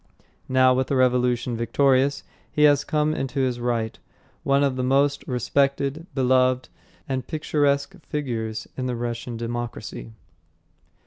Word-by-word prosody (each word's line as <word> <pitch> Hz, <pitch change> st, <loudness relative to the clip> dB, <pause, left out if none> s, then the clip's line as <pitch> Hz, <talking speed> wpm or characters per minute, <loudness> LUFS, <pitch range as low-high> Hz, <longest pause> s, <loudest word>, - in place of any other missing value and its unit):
Now, 130 Hz, 0 st, +5 dB
with 130 Hz, 0 st, 0 dB
the 140 Hz, -, 0 dB
revolution 125 Hz, -1 st, +2 dB
victorious, 135 Hz, +4 st, +2 dB, 0.3 s
he 150 Hz, -, +1 dB
has 145 Hz, -1 st, +5 dB
come 150 Hz, 0 st, 0 dB
into 135 Hz, -2 st, -2 dB
his 125 Hz, -2 st, 0 dB
right, 120 Hz, -2 st, -2 dB, 0.4 s
one 140 Hz, +1 st, +2 dB
of 135 Hz, -2 st, +1 dB
the 130 Hz, -, -2 dB
most 140 Hz, +2 st, +2 dB
respected, 140 Hz, +5 st, 0 dB
beloved 130 Hz, -1 st, +2 dB, 0.4 s
and 130 Hz, -2 st, -3 dB
picturesque 145 Hz, 0 st, 0 dB, 0.2 s
figures 115 Hz, -7 st, -3 dB
in 130 Hz, -1 st, -3 dB
the 125 Hz, -, -2 dB
Russian 120 Hz, 0 st, -4 dB
democracy. 115 Hz, -2 st, -5 dB
130 Hz, 130 wpm, -24 LUFS, 120-140 Hz, 0.4 s, Now